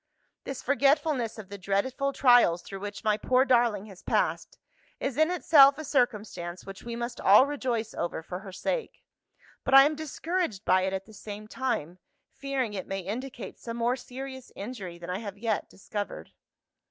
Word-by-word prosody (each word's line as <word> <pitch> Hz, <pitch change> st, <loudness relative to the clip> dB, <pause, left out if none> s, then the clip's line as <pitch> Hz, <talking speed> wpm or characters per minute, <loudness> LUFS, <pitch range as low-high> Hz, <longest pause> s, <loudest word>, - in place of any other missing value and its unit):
This 270 Hz, -2 st, -5 dB
forgetfulness 280 Hz, -3 st, +2 dB
of 210 Hz, -3 st, -9 dB
the 200 Hz, 0 st, -8 dB
dreadful 240 Hz, +9 st, 0 dB
trials 245 Hz, -11 st, +5 dB
through 195 Hz, -, -8 dB
which 205 Hz, +2 st, -6 dB
my 215 Hz, -1 st, +2 dB
poor 255 Hz, +3 st, +3 dB
darling 235 Hz, -6 st, +3 dB
has 195 Hz, -4 st, -13 dB
passed, -, -, -1 dB, 0.4 s
is, 270 Hz, -2 st, -2 dB
in 315 Hz, +3 st, +3 dB
itself, 285 Hz, -6 st, +6 dB
a 310 Hz, -, -5 dB
circumstance 210 Hz, -, -1 dB
which 195 Hz, 0 st, -9 dB
we 235 Hz, 0 st, -6 dB
must 235 Hz, 0 st, -5 dB
all 210 Hz, +7 st, +7 dB
rejoice 245 Hz, -6 st, -2 dB
over 170 Hz, -1 st, -3 dB
for 180 Hz, +2 st, -6 dB
her 195 Hz, -1 st, -10 dB
sake. 475 Hz, -, -3 dB, 0.6 s
But 270 Hz, -, +3 dB
I 270 Hz, -, +11 dB
am 300 Hz, -, +2 dB
discouraged 315 Hz, -, -3 dB
by 185 Hz, +1 st, +4 dB
it, 190 Hz, -, -2 dB
at 190 Hz, 0 st, -3 dB
the 220 Hz, -, -15 dB
same 210 Hz, 0 st, -8 dB
time; 185 Hz, -, -3 dB, 0.3 s
fearing 270 Hz, -5 st, -2 dB
it 190 Hz, -2 st, -5 dB
may 195 Hz, 0 st, -3 dB
indicate 230 Hz, +2 st, -6 dB
some 230 Hz, 0 st, -6 dB
more 240 Hz, +2 st, +1 dB
serious 260 Hz, 0 st, -8 dB
injury 200 Hz, -6 st, -7 dB
than 175 Hz, +1 st, -7 dB
I 185 Hz, -, -2 dB
have 205 Hz, -3 st, -7 dB
yet 220 Hz, 0 st, -1 dB
discovered. 205 Hz, +1 st, -6 dB
230 Hz, 175 wpm, -28 LUFS, 195-270 Hz, 0.6 s, I